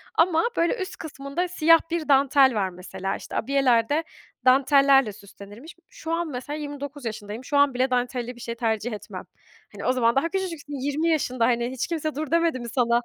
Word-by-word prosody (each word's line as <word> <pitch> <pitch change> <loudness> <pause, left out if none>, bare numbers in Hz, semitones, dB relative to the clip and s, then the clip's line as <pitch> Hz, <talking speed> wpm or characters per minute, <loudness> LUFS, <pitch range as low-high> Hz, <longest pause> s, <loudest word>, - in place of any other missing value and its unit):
Ama 330 -1 +3
böyle 335 +6 +2
üst 375 - -5
kısmında 305 +2 -4
siyah 330 -2 +5
bir 335 -3 -2
dantel 270 -2 +5
var 195 -2 0
mesela. 185 +2 -5
İşte - - -9
abiyeler 250 -3 +2
de 310 +3 +1 0.4
dantellerle 270 -2 +5
süslenirmiş. 205 - -13
Şu 330 -10 -6
an 340 0 -1
mesela 285 +3 -5
29 285 -2 -7
yaşındayım. 215 +2 -6
Şu 285 - 0
an 285 -2 +4
bile 255 +2 +1
dantelli 245 0 -2
bir 240 - -13
şey 235 0 -5
tercih 225 0 -1
etmem. 210 0 -8 0.5
Hani - - -8
o 255 - +3
zaman 235 -2 +2
daha 330 +5 +1
küçücüksün 335 -6 -4
20 290 +4 -1
yaşında 255 -7 +1
hani, 240 0 0
"Hiç 260 -1 -3
kimse 310 -3 -3
'dur' 305 0 -4
demedi 335 -5 +2
mi 235 -1 -6
sana?" 235 0 +2
270 Hz, 190 wpm, -24 LUFS, 235-310 Hz, 0.5 s, siyah